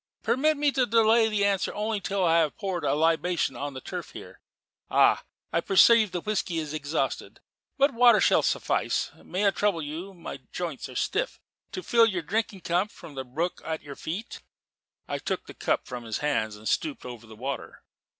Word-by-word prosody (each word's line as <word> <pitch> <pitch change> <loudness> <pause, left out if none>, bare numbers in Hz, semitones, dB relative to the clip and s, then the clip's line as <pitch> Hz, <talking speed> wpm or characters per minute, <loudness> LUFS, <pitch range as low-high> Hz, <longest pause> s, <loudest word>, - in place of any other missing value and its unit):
Permit 305 +4 +2
me 290 0 +2
to 260 -2 +1
delay 225 0 +4
the 205 -2 +1
answer 200 -2 +1
only 210 0 -1
till 195 -1 0
I 165 0 +4
have 155 -3 0
poured 190 -5 -3
libation 165 +4 +1
on 145 -1 -5
the 130 - -6
turf - - -7
here. - - -11 0.5
Ah! - - +4 0.3
I 170 - +2
perceive 215 +3 +6
the 180 -1 -4
whisky 195 -4 -1
is 155 -2 -3
exhausted: 150 0 -2 0.4
but 280 0 +3
water 235 -2 +6
shall - - +4
suffice. - - 0
May 190 +3 -1
I 200 - +5
trouble 195 -3 0
you 170 +7 -6
my 170 - -7
joints - - -4
are - - -11
stiff - - -1 0.3
to 370 - -4
fill 230 -1 +5
your 185 -6 -2
drinking 200 +2 -2
cup 175 +5 0
from 155 - -12
the 135 -1 -4
brook 155 +8 -3
at 160 -1 -4
your 140 -1 -8
feet?" 190 - -6 0.7
I - - -3
took - - -3
the - - -10
cup - - -1
from 125 -2 -6
his 110 - -2
hands 110 -8 -1
and 105 +1 -9
stooped 150 -5 -1
over 120 -2 -9
the 110 - -12
water. 135 +5 -6
180 Hz, 190 wpm, -27 LUFS, 150-215 Hz, 0.7 s, perceive